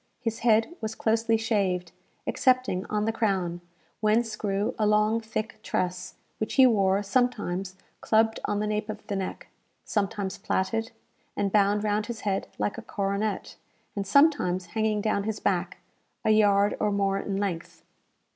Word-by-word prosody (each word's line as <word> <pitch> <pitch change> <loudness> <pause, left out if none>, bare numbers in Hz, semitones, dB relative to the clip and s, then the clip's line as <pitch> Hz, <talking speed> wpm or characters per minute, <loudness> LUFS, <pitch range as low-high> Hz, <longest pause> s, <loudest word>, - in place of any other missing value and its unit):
His 225 -2 -3
head 225 +5 +3
was 220 0 -3
closely 225 0 +2
shaved, 195 -6 0 0.3
excepting 255 -8 +1
on 210 0 -1
the 225 - +1
crown, 190 -6 -1 0.4
whence 220 +1 +2
grew 200 -1 -1
a 215 - +3
long 210 +2 +3
thick 220 0 -4
tress, 180 0 -2 0.2
which 215 - -2
he 265 - +8
wore 200 -4 +3
sometimes 195 -5 0 0.2
clubbed 220 0 +2
on 205 - -1
the 210 - 0
nape 210 0 -2
of 215 0 -6
the 200 - -3
neck; 190 -1 -5 0.4
sometimes 200 -2 -2
plaited, 225 +4 -1 0.5
and 200 -1 0
bound 205 0 +3
round 210 +1 0
his 235 -2 -5
head 195 -2 -1
like 205 - -2
a - - -7
coronet; 200 0 -2 0.4
and 200 -1 -3
sometimes 200 - +3
hanging 220 -1 +1
down 200 -1 0
his 220 -1 -2
back, - - -1 0.5
a 220 - +4
yard 205 -1 +4
or 210 - +1
more 195 -1 +1
in 195 0 -3
length. 190 -5 -4
210 Hz, 155 wpm, -27 LUFS, 195-220 Hz, 0.5 s, he